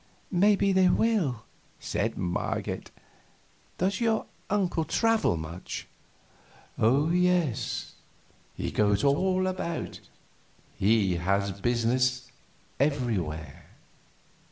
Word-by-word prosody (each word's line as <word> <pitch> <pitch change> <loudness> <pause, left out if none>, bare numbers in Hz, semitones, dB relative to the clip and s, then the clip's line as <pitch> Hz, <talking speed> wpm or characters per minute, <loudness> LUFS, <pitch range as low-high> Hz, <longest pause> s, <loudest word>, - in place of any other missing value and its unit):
"Maybe 200 +1 +4
they 185 -1 +5
will," 180 - +1 0.4
said - - -2
Marget. 90 -1 -3 0.9
"Does 190 +4 0
your 225 -2 +1 0.2
uncle 185 -5 +1
travel 225 - +2
much?" 80 +3 -6 0.9
"Oh 140 +8 +3
yes, 175 -9 0 0.6
he - - -3
goes 105 -1 +2
all 185 +7 +2
about; 185 -3 -3 0.8
he 100 -3 +2
has 100 +3 0
business 125 +4 0 0.5
everywhere." 100 - -1
135 Hz, 85 wpm, -28 LUFS, -, 0.9 s, they